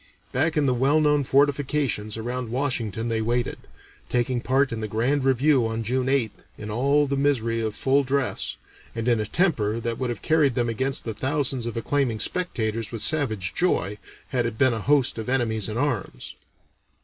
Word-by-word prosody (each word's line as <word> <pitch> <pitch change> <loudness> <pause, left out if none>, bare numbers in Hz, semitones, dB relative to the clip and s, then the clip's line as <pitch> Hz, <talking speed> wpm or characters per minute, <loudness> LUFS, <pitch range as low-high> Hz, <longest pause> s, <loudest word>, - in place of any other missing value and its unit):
Back 160 +5 +1
in 150 - +3
the 130 - +3
well 135 +5 +3
known 150 -1 +3
fortifications 140 -5 +1
around 120 +1 -4
Washington 115 -4 -2
they 115 -1 0
waited, 120 +2 -1 0.5
taking 120 0 0
part 135 +2 +2
in 115 -1 -4
the 110 - -2
Grand 125 +7 0
Review 135 -1 +3
on 115 0 -3
June 130 +3 -1
8th, 135 -5 -1
in 105 0 -6
all 140 +6 +2
the 140 0 -1
misery 120 -5 +1
of 110 -1 -2
full 135 +1 +2
dress, 135 0 -2 0.4
and 115 0 -3
in 120 -2 +3
a 105 - -2
temper 115 - +1
that 115 0 -3
would 130 -2 -1
have 120 -4 -5
carried 150 -6 +3
them 120 -2 +1
against 130 +4 -2
the 115 - -3
thousands 130 +1 -1
of 115 - -5
acclaiming 120 -2 0
spectators 115 - -2
with 115 -3 0
savage 110 - +1
joy, 105 - 0 0.3
had 125 -3 0
it 115 -1 -6
been 130 -1 +4
a 110 - -3
host 140 -1 +2
of 110 - -5
enemies 110 -5 0
in 110 - -4
arms. 130 -6 -2
125 Hz, 185 wpm, -24 LUFS, 115-140 Hz, 0.5 s, been